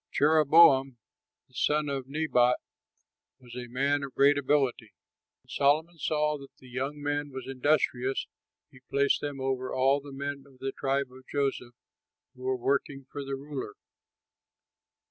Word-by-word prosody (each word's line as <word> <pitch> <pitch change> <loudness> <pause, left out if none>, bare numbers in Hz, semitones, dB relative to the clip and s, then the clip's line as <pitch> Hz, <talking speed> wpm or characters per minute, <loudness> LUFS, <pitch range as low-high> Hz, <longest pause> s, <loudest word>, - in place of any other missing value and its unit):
Jeroboam, 145 -3 +5 0.5
the - - -31
son 150 +4 +1
of 135 -2 -3
Nebat, 135 -4 +2 0.8
was 125 -2 -13
a 125 -1 -6
man 140 +4 0
of 140 -2 -7
great 140 +1 +5
ability. 135 -5 0 0.5
When - - -30
Solomon 160 +4 +1
saw 150 0 0
that 140 - -11
the 130 - -16
young 135 +4 -3
man 145 0 -1
was 130 -1 -7
industrious, 135 -1 0 0.5
he 130 - -16
placed 140 0 +2
him 145 -2 -4
over 130 -1 -2
all 135 +2 +2
the 140 0 -11
men 140 0 -5
of 135 -2 -20
the 135 +1 -3
tribe 135 -1 -1
of 130 0 -15
Joseph 135 -4 -2 0.6
who 130 - -17
were 130 0 -1
working 135 +1 -1
for 145 - -5
the 135 0 -4
ruler. 135 -5 -6
140 Hz, 150 wpm, -28 LUFS, 130-145 Hz, 0.8 s, Jeroboam